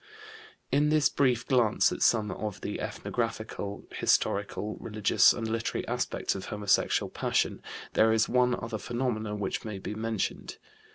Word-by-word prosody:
In 145 +2 +3
this 155 -1 +4
brief 125 -4 +1
glance 120 -5 +3
at - - -5
some 110 -3 +3
of 105 +1 -5
the - - -4
ethnographical, 110 -3 -4
historical, 100 +1 0
religious, 105 -2 +4
and 115 - -3
literary 115 0 -2
aspects - - -1
of 95 - -6
homosexual 105 -2 +1
passion - - 0 0.3
there 110 0 +4
is 110 0 +3
one 125 0 +3
other 115 -1 -4
phenomenon 110 -2 -2
which 100 -2 -2
may 105 -3 -5
be 95 - -5
mentioned. 110 -1 -3
110 Hz, 145 wpm, -29 LUFS, 105-120 Hz, 0.3 s, this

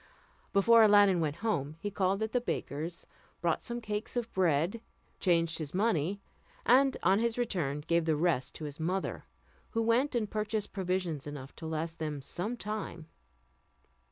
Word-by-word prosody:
Before 230 +4 +6
Aladdin 205 -4 +6
went 150 -3 0
home, 155 -9 0
he 205 +2 -4
called 195 +2 +1
at 220 +2 -4
a 250 - +3
baker's, 165 -6 -4 0.3
bought 170 -2 0
some 240 0 -3
cakes 210 0 -4
of 235 -1 -3
bread, 175 +4 +1 0.4
changed 165 -3 +2
his 155 +1 -5
money, 195 -2 +1 0.5
and 265 +3 +5
on 190 +3 +4
his 235 0 0
return 170 - -1
gave 170 +2 +1
the 160 -2 +2
rest 150 -4 0
to 155 - -6
his 145 0 -7
mother, 185 +4 -2 0.4
who 225 - -1
went 245 +5 +2
and 225 -3 +1
purchased 215 0 -2
provisions 180 -6 -2
enough 140 -2 -8
to 160 - -6
last 160 +1 -3
them 150 -2 -3
some 180 - -4
time. 205 -7 -5
185 Hz, 160 wpm, -31 LUFS, 160-215 Hz, 0.5 s, Before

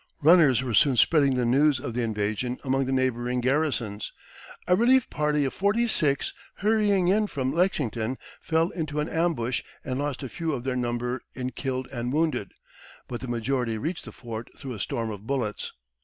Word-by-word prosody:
Runners 155 -6 +6
were 125 -3 -3
soon 130 +4 +4
spreading 140 +1 +4
the 125 -1 +1
news 135 +3 +4
of 130 -3 -5
the 125 - -1
invasion 110 +3 -1
among 135 0 +1
the - - -1
neighboring 125 -1 0
garrisons. 125 -6 0 0.6
A 180 - +5
relief 250 +4 +4
party 150 -1 +1
of 135 - -2
forty 210 +5 +2
six 145 -10 0 0.2
hurrying 205 -3 +2
in 210 +3 +3
from 130 -6 -2
Lexington 130 - 0 0.2
fell 165 +2 +1
into 155 -4 -3
an 150 - 0
ambush 160 -8 0 0.2
and 130 0 -2
lost 145 -1 -2
a - - -3
few 165 +2 -2
of 125 -3 -3
their 130 -1 -1
number 120 0 -2
in 130 0 -3
killed 130 -1 -3
and 120 -1 -3
wounded, 155 - 0 0.6
but 120 - -5
the 130 - -5
majority 120 -1 -1
reached 160 +10 -4
the - - -8
fort 115 -1 -7
through 130 -2 -6
a 110 - -7
storm 115 +4 -2
of 105 +1 -9
bullets. 125 -7 -2
130 Hz, 185 wpm, -26 LUFS, 120-155 Hz, 0.6 s, Runners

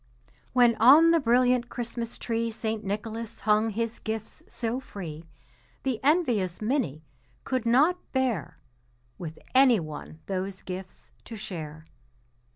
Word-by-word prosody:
When 245 -2 +6
on 295 +9 +8
the 335 - +5
brilliant 250 -1 +3
Christmas 235 -1 -5
tree 230 0 -1
St. 220 -1 -3
Nicholas 220 +3 -5
hung 215 +1 +3
his 230 +2 -3
gifts 220 -1 -5
so 235 +1 -3
free, 170 -10 -8 0.6
The 260 -5 -1
envious 245 - +2
Minnie 215 - -1 0.4
could 255 -3 -1
not 300 +10 +4
bear 255 - -1 0.6
With 160 -3 -6 0.2
any 255 -4 +6
one 155 0 -8
those 190 0 -4
gifts 185 0 -8
to 230 - -8
share. 160 -6 -7
225 Hz, 125 wpm, -27 LUFS, 195-250 Hz, 0.6 s, on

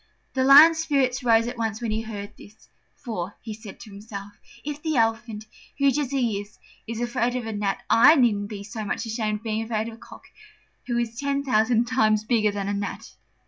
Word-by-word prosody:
The 260 - +1
Lion's 300 +5 +8
spirits 275 -5 0
rose 230 -1 +4
at 240 0 -6
once 220 -2 -2
when 235 -2 -3
he 220 +1 -1
heard 205 -2 -7
this: 215 +2 -17 0.3
"For," 205 -6 -6
he 220 - -7
said 215 -2 -11
to 215 - -11
himself, 200 0 -9 0.3
"if 295 0 -5
the 315 -1 -1
Elephant, 225 -2 0 0.3
huge 280 0 +2
as 285 -4 -2
he 240 -7 0
is, 205 +1 -15 0.3
is 230 0 -5
afraid 240 0 -1
of 250 -2 -3
a 225 - -4
gnat, 205 -1 -2
I 265 +7 +7
needn't 210 -7 +2
be 205 -2 -7
so 215 +2 -6
much 210 +3 -3
ashamed 215 -2 -2
of - - -25
being 220 -1 -2
afraid 225 0 -2
of - - -10
a - - -12
cock, - - -14 0.6
who 240 -1 -1
is 235 0 -3
ten 280 0 -1
thousand 230 -2 +2
times 215 -4 +2
bigger 215 -2 +2
than 200 -1 -4
a 205 - -1
gnat." 200 0 -5
225 Hz, 215 wpm, -24 LUFS, 215-250 Hz, 0.6 s, Lion's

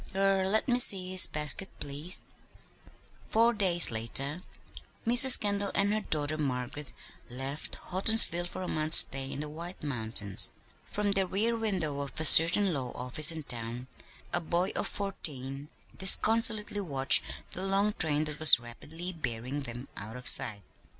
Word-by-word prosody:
Er 195 -1 0
let 220 +2 +1
me 245 -1 0
see 185 -6 +4
his 185 0 +6
basket, 150 +5 +1
please." 145 +6 -3 1.1
Four 230 +2 +2
days 180 - +1
later 135 +8 -3 0.6
Mrs. 245 +3 +6
Kendall 200 -1 -2
and 200 +1 0
her 215 - -3
daughter 155 -4 -2
Margaret 135 0 -6 0.4
left 135 +4 -7
Houghtonsville 185 -2 +1
for 185 - -9
a - - -7
month's 155 +1 +4
stay 135 0 +2
in 140 - -7
the 150 - -7
White 170 +4 -10
Mountains. 110 -7 -2 0.3
From 205 -1 -3
the 195 -1 -1
rear 220 +5 -2
window 185 -10 -4
of 140 +1 -7
a 160 - -1
certain 170 +5 +5
law 130 -4 -6
office 145 +6 +2
in 160 -1 -8
town 120 -1 -4 0.5
a 175 - 0
boy 175 +3 -2
of - - -2
fourteen 145 -8 -4 0.3
disconsolately 215 +2 +3
watched 135 -7 +4 0.3
the 185 - -6
long 195 +2 -1
train 150 -4 -3
that 150 -1 -7
was 155 -6 +7
rapidly 160 +10 -7
bearing 130 -2 -6
them 120 0 -10
out 110 +3 -11
of 125 - -10
sight. 105 -3 +3
160 Hz, 155 wpm, -27 LUFS, 135-195 Hz, 1.1 s, was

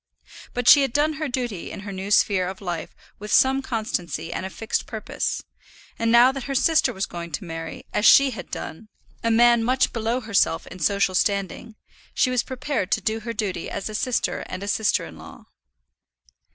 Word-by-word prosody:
But 245 -1 -2
she 285 - +9
had 270 -3 0
done 300 +2 +2
her 310 - 0
duty 245 -8 -4
in - - -8
her 200 0 -7
new 190 +1 -5
sphere 195 -3 +3
of 190 +1 -6
life 175 -4 -5 0.2
with 210 +1 -7
some 265 +1 +4
constancy 185 - -3
and 190 - -3
a - - -8
fixed 225 +3 -3
purpose; - - -3 0.6
and 230 0 +1
now 240 +2 +7
that 270 -1 -6
her 275 - -3
sister 320 +4 +3
was 190 0 -2
going 170 -1 -7
to - - -3
marry, 165 -2 -7
as - - 0
she 275 +3 +7
had - - -8
done, 215 +7 -7 0.4
a 230 - +1
man 235 0 +5
much 255 +3 +1
below 230 +2 -1
herself 200 -7 +1
in 185 - -11
social 195 +3 +1
standing, 200 +3 -1 0.4
she 255 - +2
was 250 -1 +2
prepared 255 -6 -3
to - - +1
do 220 +3 -1
her 230 +1 -5
duty 200 -7 -3
as 200 - -4
a - - -7
sister 245 +3 -1
and 185 +1 -6
a - - -5
sister 210 +1 +1
in - - -12
law. - - -13
220 Hz, 200 wpm, -23 LUFS, 190-250 Hz, 0.6 s, she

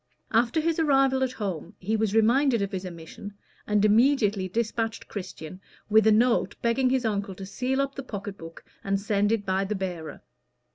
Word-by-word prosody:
After 235 +6 +2
his 330 +1 0
arrival 270 -4 +3
at 255 -1 -1
home 185 -6 -5
he 210 +4 -2
was 220 -1 0
reminded 235 +1 +3
of 200 - -3
his 190 -1 -4
omission, 175 +4 -10 0.3
and 210 0 +3
immediately 215 -4 +3
dispatched 225 +2 -2
Christian 185 -2 -8 0.3
with 220 0 +5
a - - +6
note 235 +3 +2
begging 250 +2 +2
his 255 -1 +1
uncle 200 -3 -2
to 195 - -8
seal 255 +7 -2
up 275 0 0
the 275 - -6
pocket 205 -5 -6
book 165 -2 -11 0.2
and 195 0 0
send 205 0 +1
it 220 -3 0
by 190 0 +1
the 205 +2 -2
bearer. 180 -5 -5
215 Hz, 185 wpm, -26 LUFS, 195-245 Hz, 0.3 s, a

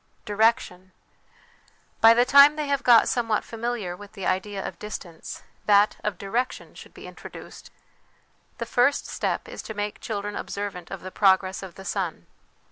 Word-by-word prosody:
Direction. 205 -4 0 1.1
By 225 +1 +8
the 245 +1 +4
time 280 +3 +7
they 305 -1 -2
have 280 -1 0
got 235 -2 +6
somewhat 225 -3 0
familiar 230 -5 -4
with 205 +2 -13
the 195 -3 -6
idea 195 +1 -2
of 175 - -9
distance, 180 -6 -8 0.2
that 205 0 +4
of 210 -4 -2
direction 235 +7 -3
should - - -14
be - - -11
introduced. - - -11 0.9
The 235 - -4
first 245 +4 +2
step - - -3
is - - -7
to 220 - -8
make 205 0 -4
children 205 -1 -4
observant 200 -4 -5
of 195 - -7
the 185 - -8
progress 190 -1 +2
of 190 -3 -9
the 195 - -11
sun. 180 - -3
205 Hz, 160 wpm, -25 LUFS, 190-230 Hz, 1.1 s, By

